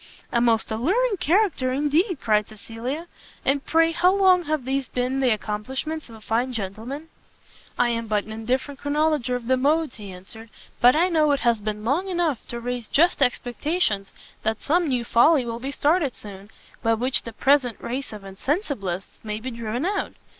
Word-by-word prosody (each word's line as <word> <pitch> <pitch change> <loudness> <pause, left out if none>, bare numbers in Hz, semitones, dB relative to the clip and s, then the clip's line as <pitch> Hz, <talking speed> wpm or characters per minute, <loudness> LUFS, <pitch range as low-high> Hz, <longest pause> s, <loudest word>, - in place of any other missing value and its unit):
"A 235 - +2
most 230 -2 +2
alluring 395 - +1
character 360 -7 +2
indeed!" 300 - +1
cried 210 -2 +2
Cecilia; 230 +8 -6 0.4
"and 275 +1 +2
pray 330 0 +3
how 355 +2 +4
long 375 -3 +4
have 300 -4 -1
these 270 0 -1
been 255 +2 -1
the 260 -2 +3
accomplishments 255 +9 -3
of 225 - -11
a 220 - -14
fine 240 +4 0
gentleman?" 230 +9 -5 0.7
"I 245 - +3
am 230 -1 -2
but 210 -1 +1
an 220 - -11
indifferent 255 +6 -2
chronologer 290 -3 +1
of 245 -1 -5
the 260 +2 +2
modes," 300 +1 +1
he 205 -3 -8
answered, 205 +5 -11 0.3
"but 245 +2 +6
I 345 +4 +3
know 305 -4 +3
it 280 - -1
has 235 -2 +2
been 210 0 -4
long 330 +11 0
enough 340 -8 0
to 235 - -5
raise 245 -1 -4
just 340 +1 +3
expectations 245 - 0 0.3
that 220 0 -2
some 340 +3 +2
new 250 -4 0
folly 265 +4 +4
will 230 0 -4
be 265 +3 -4
started 290 -1 +2
soon, 200 -1 -10 0.3
by 225 0 +2
which 250 +4 +1
the 230 - -7
present 260 -1 +2
race 260 +3 -4
of 210 -2 -9
INSENSIBLISTS 195 - -3
may 215 -1 -4
be 255 +3 -5
driven 235 +4 -3
out. 400 +2 -1
255 Hz, 180 wpm, -24 LUFS, 225-310 Hz, 0.7 s, but